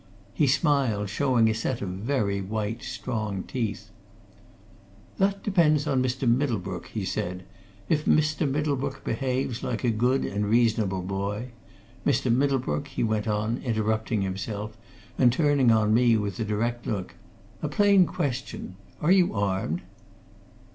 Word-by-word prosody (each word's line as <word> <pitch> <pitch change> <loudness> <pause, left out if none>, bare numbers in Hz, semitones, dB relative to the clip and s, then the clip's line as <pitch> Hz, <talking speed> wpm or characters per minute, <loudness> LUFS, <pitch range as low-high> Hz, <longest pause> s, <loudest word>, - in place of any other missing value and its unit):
He 150 - +2
smiled, 135 -7 +2
showing 125 -1 +3
a 110 - +2
set 115 +2 -2
of 100 - -4
very 100 0 -1
white, 110 +3 -3
strong 105 -4 -3
teeth. 115 -6 -4 1.3
"That 195 +1 +1
depends 155 -7 +3
on 130 -1 +1
Mr. 130 0 -1
Middlebrook," 115 -8 0
he 105 -4 -4
said. 90 0 -3 0.4
"If 155 -1 +1
Mr. 155 -1 +2
Middlebrook 140 -1 -2
behaves 130 0 -2
like 115 - -3
a 120 - +3
good 125 +5 +1
and 105 +1 -2
reasonable 110 -5 +2
boy 100 +5 -3 0.5
Mr. 130 -4 +2
Middlebrook," 135 +2 0
he 135 - -3
went 110 -1 0
on, 105 +3 0
interrupting 110 -2 0
himself 100 +3 -4 0.4
and 120 - +6
turning 145 -2 +3
on 110 -1 +3
me 120 -1 +4
with 100 -3 -3
a - - 0
direct 115 +3 -2
look, 100 -4 -3 0.5
"a - - -2
plain 200 -3 +5
question? 130 - -4 0.3
Are 160 - +4
you 185 -9 +4
armed?" 95 -5 -1
115 Hz, 140 wpm, -26 LUFS, 105-135 Hz, 1.3 s, and